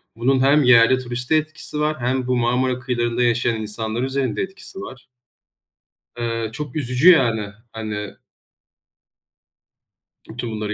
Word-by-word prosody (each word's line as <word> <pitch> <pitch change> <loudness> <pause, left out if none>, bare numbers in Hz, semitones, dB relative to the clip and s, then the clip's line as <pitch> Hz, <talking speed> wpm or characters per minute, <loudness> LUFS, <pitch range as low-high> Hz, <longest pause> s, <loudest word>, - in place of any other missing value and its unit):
Bunun 130 +3 +2
hem 140 +2 +4
yerli 125 +1 +6
turiste 125 +5 -2
etkisi 155 -1 -3
var 150 -1 0
hem 125 +1 -1
bu 125 - +1
Marmara 125 +1 +1
kıyılarında 120 -1 -1
yaşayan 120 -1 +1
insanlar 110 +2 -4
üzerinde 130 -3 -1
etkisi 190 0 -8
var. 130 -1 -10 1.1
Iıı, 115 -2 -2
çok 145 +4 -7
üzücü 135 +4 +4
yani, 115 - +2 0.2
hani 105 -2 -5 2.1
bütün 120 0 -5
bunları 105 -1 -3
125 Hz, 125 wpm, -21 LUFS, 115-135 Hz, 2.1 s, yerli